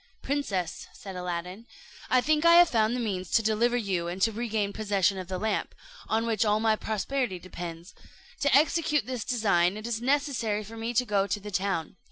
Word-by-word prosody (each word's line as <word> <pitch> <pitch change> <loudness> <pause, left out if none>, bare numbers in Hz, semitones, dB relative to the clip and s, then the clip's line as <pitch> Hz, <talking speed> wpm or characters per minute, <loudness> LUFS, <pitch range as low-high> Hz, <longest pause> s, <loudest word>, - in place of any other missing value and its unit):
"Princess," 200 - -2
said 195 -2 -9
Aladdin, 180 +4 -5 0.4
"I 255 - +4
think 305 +3 +2
I 335 0 +7
have 350 0 +7
found 225 -2 +2
the - - -2
means 195 -6 -3
to 225 - +4
deliver 230 +3 +2
you 190 -7 -1
and 175 +2 -4
to 225 - +3
regain 215 -3 -2
possession 200 -3 +1
of 185 - -7
the 185 0 -3
lamp, 215 +2 -2 0.3
on 225 +1 +1
which 225 -1 +1
all 210 0 +2
my 220 0 +3
prosperity 220 0 -2
depends; 175 -1 -8 0.5
to 285 -2 +3
execute 300 -2 +3
this 250 -3 -4
design 200 -7 +2
it 215 - -7
is 235 -1 -2
necessary 255 -6 0
for 220 +3 -10
me 230 +2 -4
to 250 - +3
go 200 -3 +1
to 205 - -1
the 210 +1 -8
town. 185 -2 -2
215 Hz, 200 wpm, -28 LUFS, 190-240 Hz, 0.5 s, I